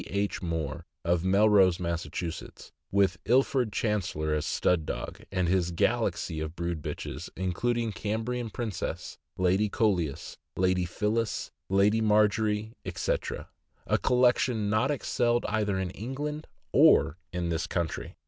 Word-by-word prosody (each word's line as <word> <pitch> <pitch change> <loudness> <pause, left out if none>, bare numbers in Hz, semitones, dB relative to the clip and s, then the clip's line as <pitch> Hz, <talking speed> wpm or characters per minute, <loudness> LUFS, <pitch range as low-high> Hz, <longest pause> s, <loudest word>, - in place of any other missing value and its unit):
H. 100 +1 -1
Moore, 80 -5 -3 0.2
of 85 0 +2
Melrose, 95 -2 +5
Mass., 85 -1 -2 0.8
with 95 -2 +2
Ilford 125 0 +3
Chancellor 95 -8 -1
as 75 -1 -1
stud 90 -3 +2
dog, - - -5
and 90 -2 0
his 90 -1 +2
galaxy 85 -1 0
of 80 +1 -4
brood 85 -2 -3
bitches - - -5
includes 115 +5 -1
Cambrian 115 +3 -2
Princess, 110 -4 -4 0.2
Lady 95 +3 +2
Coleus, 90 -11 0 0.2
Lady 90 -1 +2
Phyllis, 105 +4 -1 0.2
Lady 100 +3 +3
Margery, 105 0 +2
etc.; - - -3 0.4
a - - +1
collection 120 -3 +2
not 110 +5 +2
excelled 120 -4 +1
either 105 -2 0
in 95 -1 -2
England 145 +9 -5 0.2
or 85 - +5
in 90 -1 -2
this 85 0 -1
country. 85 -3 -3
100 Hz, 125 wpm, -28 LUFS, 90-110 Hz, 0.8 s, Melrose